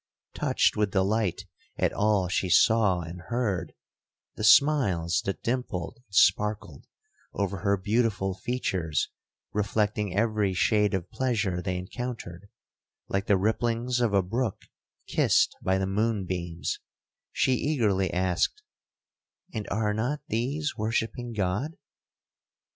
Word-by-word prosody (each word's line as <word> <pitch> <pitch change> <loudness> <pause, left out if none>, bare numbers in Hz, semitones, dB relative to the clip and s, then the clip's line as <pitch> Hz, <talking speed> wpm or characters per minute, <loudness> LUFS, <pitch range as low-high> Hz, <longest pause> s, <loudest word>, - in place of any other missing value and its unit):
Touched - - +2
with 105 -1 +1
delight 95 -1 0 0.3
at - - +1
all 105 -3 +2
she 90 +1 -1
saw 105 -2 +4
and 85 +2 -8
heard,—the 110 -2 -5
smiles 105 - +4
that 100 - -3
dimpled 115 -8 -2
and 100 - -12
sparkled 105 +3 +2 0.5
over 100 -1 -2
her 100 +3 +1
beautiful 100 -1 0
features 95 -7 -2 0.4
reflecting 105 -1 0
every 105 -3 +1
shade 105 +1 +2
of 90 -1 -4
pleasure 105 -9 0
they 90 -1 -2
encountered, 100 -2 -6 0.6
like 95 +1 -1
the 100 - +4
ripplings 115 +4 0
of 120 -3 +2
a 100 -2 +3
brook 115 +3 -2 0.4
kissed - - +2
by 95 0 +1
the 95 - 0
moon 105 +1 0
beams,—she 85 +7 -3
eagerly 110 - +1
asked, 95 - 0 0.9
'And 105 - -4
are 105 0 0
not 125 +8 -1
these 140 +8 -1
worshipping 115 +2 -2
God?' 105 - -2
105 Hz, 115 wpm, -27 LUFS, 95-115 Hz, 0.9 s, saw